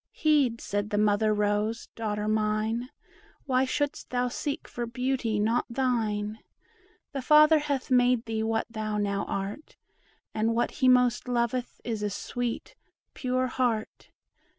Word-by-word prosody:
"Heed," 285 -7 +2
said 205 0 -2
the 205 - -1
mother 210 +1 +3
rose, 210 +2 0
"daughter 210 -2 -3
mine, 215 +3 0 0.6
Why 260 -1 +2
shouldst 290 +2 -2
thou 250 0 0
seek 290 +4 -4
for 240 -1 -4
beauty 250 -2 -1
not 225 +3 +1
thine? 220 -4 -1 0.7
The 275 - -3
Father 305 +3 +6
hath 285 -3 -3
made 245 -1 +4
thee 225 -1 -2
what 225 0 0
thou 215 -2 -3
now 200 -1 -1
art; 200 +10 -5 0.6
And 225 +1 +1
what 240 - +1
he 260 - +1
most 250 -1 +4
loveth 245 0 -1
is 225 -3 -3
a 210 - 0
sweet, 240 +4 -4 0.4
pure 255 -2 0
heart. 245 -4 -2
235 Hz, 140 wpm, -28 LUFS, 215-255 Hz, 0.7 s, Father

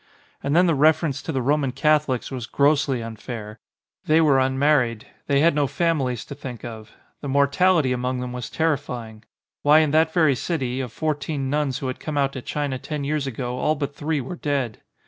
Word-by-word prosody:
And 140 +2 -1
then 180 +2 +6
the 170 - +3
reference 155 -1 +2
to - - -4
the 130 -2 -1
Roman 140 0 +1
Catholics 145 -2 +1
was 125 -3 -5
grossly 140 -4 +2
unfair. 110 -1 -7 0.5
They 155 +1 +4
were 145 -4 +4
un 130 0 +1
married. 130 -6 +2 0.2
They 140 0 +3
had 170 +2 +5
no 145 -1 +1
families 140 -6 -1
to - - -8
think 130 -5 -8
of. 110 -2 -9 0.3
The 145 - -5
mortality 140 +2 +3
among 125 +1 -2
them 125 0 -5
was 125 -1 -5
terrifying. 125 -8 -2 0.4
Why, 150 +1 +6
in 155 -2 +1
that 160 +1 +3
very 160 -5 +4
city, 130 -2 -2
of 125 -4 -5
fourteen 145 -2 -2
nuns 145 -3 0
who 135 - -4
had 130 - -4
come 155 -2 -4
out 140 -1 +1
to 130 - -5
China 140 -1 -3
ten 150 +1 -4
years 145 0 -1
ago 125 0 -4
all 155 - +1
but 140 -1 -4
three 150 +1 -1
were 135 +7 -5
dead. 140 -8 -2
140 Hz, 200 wpm, -23 LUFS, 125-150 Hz, 0.5 s, then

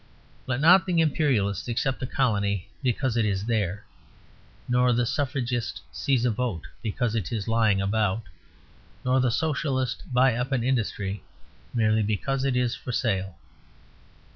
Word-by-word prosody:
Let 130 0 -1
not 180 +5 +6
the 175 -2 +2
Imperialist 130 - +1
accept 125 +3 -1
a 130 - -2
colony 100 -7 0
because 130 -1 0
it 115 - +2
is 100 -1 -1
there, 105 -3 -1 0.8
nor 125 0 +3
the 120 +1 +2
Suffragist 125 -3 -2
seize 130 -3 0
a 120 - +3
vote 110 -7 -3 0.2
because 115 +1 -1
it 105 -8 -2
is 110 -2 -3
lying 110 -3 +3
about, 105 +2 0 0.8
nor 130 +1 +3
the 130 -1 +2
Socialist 130 -2 -1
buy 125 0 +4
up 125 +4 -2
an 125 -4 +1
industry 105 -5 -1 0.5
merely 110 -1 +3
because 110 +6 -1
it 130 -2 +1
is 125 -1 +1
for 125 - -6
sale. 95 -7 -1
120 Hz, 145 wpm, -26 LUFS, 105-130 Hz, 0.8 s, not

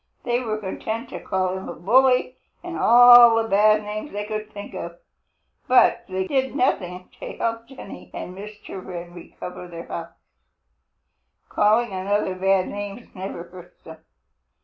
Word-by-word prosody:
They 240 0 0
were 220 -4 -3
content 220 +4 -5
to - - -7
call 185 -1 -1
him 190 - -7
a - - -6
bully 255 +6 +3 0.3
and 350 -1 -6
all 240 0 +8
the 225 0 +1
bad 215 +1 +4
names 210 +7 -6
they 205 0 -4
could 215 0 -5
think 205 0 -9
of, 170 -2 -7 0.7
but 255 0 +4
that 190 0 -3
did 265 -1 -1
nothing 180 -9 -1
to - - -7
help 230 0 -3
Jenny 265 -7 -11
and 180 - -7
Mr. 205 -1 -9
Wren 175 -1 -8
recover 180 +1 -9
their 170 -1 -9
house. 170 0 -7 1.3
Calling 215 +2 +2
another 190 +1 -1
bad 190 0 +1
names 205 +3 -7
never 185 -2 -6
hurts 175 0 -15
him. 160 0 -11
205 Hz, 150 wpm, -23 LUFS, 185-230 Hz, 1.3 s, all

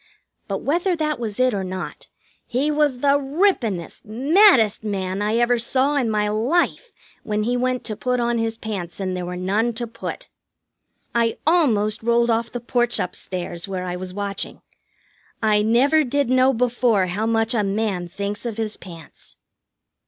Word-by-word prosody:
But - - -3
whether 350 +5 +1
that 305 -3 -1
was 220 -2 -4
it 255 -1 +3
or 195 -2 -2
not, 185 0 -6 0.4
he 275 +5 0
was 295 -4 +1
the 285 0 +4
rippenest, 270 - 0
maddest 255 - +4
man 195 -2 -2
I 210 +2 0
ever 240 0 +3
saw 265 +5 +1
in 255 -5 +1
my 210 -1 +1
life 280 - 0 0.3
when 210 0 -1
he 240 +3 0
went 255 0 0
to 215 - -3
put 250 +3 -1
on 235 0 0
his 225 0 -2
pants 195 -7 -5
and 185 -1 -2
there 180 -1 -4
were 180 - -4
none 205 +6 0
to 240 +2 -4
put. 230 0 -7 0.9
I 230 -1 +1
almost 240 -11 +2
rolled 235 +1 +2
off 230 0 0
the 245 - -4
porch 240 0 0
up 180 - -2
stairs, 175 -1 -5
where 190 -2 -4
I 180 0 -3
was 180 0 -6
watching. 200 0 -4 0.8
I 215 -2 +3
never 265 +8 +4
did 280 -1 0
know 255 +1 +5
before 240 -4 +2
how 200 +5 -2
much 225 0 +1
a 220 -3 +1
man 195 -3 -1
thinks 200 +3 -4
of 230 -3 -4
his 220 -1 -3
pants. 165 -5 -13
225 Hz, 175 wpm, -22 LUFS, 205-255 Hz, 0.9 s, know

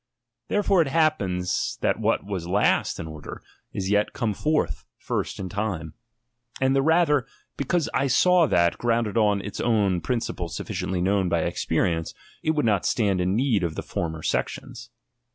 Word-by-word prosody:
Therefore 200 -3 +3
it 160 - +1
happens, 120 - 0
that - - +1
what - - +1
was 95 -4 -4
last 100 +4 +1
in 85 - -4
order, 80 -2 -9 0.3
is 95 0 -3
yet 105 0 +2
come 115 -4 -1
forth 155 +8 -1
first - - -3
in 95 - -4
time. 95 -6 -3 0.7
And 135 0 +2
the 135 - +4
rather, 150 -3 +3 0.3
because 155 +4 0
I 140 - +1
saw 175 +5 +4
that, 85 -5 +2
grounded 115 -3 0
on 105 -3 +3
its 100 - -7
own 100 -6 +2
principles 85 -3 -3
sufficiently 90 -1 -3
known 95 0 +1
by 85 -1 +1
experi 85 - 0
ence, 80 0 -6 0.3
it 155 0 0
would 150 - +1
not 100 -5 +2
stand 100 -5 +1
in 90 +2 +1
need 120 -4 +2
of 85 -2 -2
the - - -4
former 80 -2 -4
sections. 120 0 -3
105 Hz, 170 wpm, -25 LUFS, 90-135 Hz, 0.7 s, the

